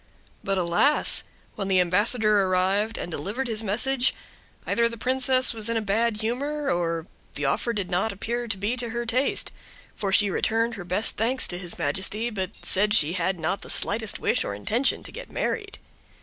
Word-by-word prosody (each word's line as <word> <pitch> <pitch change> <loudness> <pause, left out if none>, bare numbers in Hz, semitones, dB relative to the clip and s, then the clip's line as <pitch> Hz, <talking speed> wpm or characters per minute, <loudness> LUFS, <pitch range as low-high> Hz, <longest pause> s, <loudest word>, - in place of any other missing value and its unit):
But, 195 0 -1
alas! 180 - +2 0.3
when 195 - -5
the 190 -1 +2
ambassador 210 +4 +3
arrived 190 +4 0
and 175 - -5
delivered 205 - -4
his 220 -2 -1
message, 245 +5 +2 0.5
either 235 0 +2
the 230 - -6
princess 255 +2 +3
was 225 0 -2
in 225 -1 -1
bad 215 +2 0
humor, 280 +5 -2
or 165 -2 -2 0.3
the 145 - -1
offer 140 - 0
did 200 -5 -3
not 185 +5 0
appear 235 +5 -4
to 210 -3 -1
be 205 +6 -2
to 240 -1 -2
her 235 +1 -4
taste; 255 +4 +1 0.4
for 200 -2 -3
she 200 0 +4
returned 230 +3 +1
her 195 -6 -8
best 185 +5 0
thanks 245 +4 +1
to 175 - -2
his 175 -2 -6
majesty, 195 +10 0
but 190 -4 -3
said 210 +2 +3
she 155 -5 +2
had 185 +1 0
not 165 +5 -2
the - - -10
slightest 220 +1 +3
wish - - 0
or 100 - -5
intention 225 - 0
to - - -9
get - - -9
married. 410 -3 -3
215 Hz, 185 wpm, -24 LUFS, 185-235 Hz, 0.5 s, she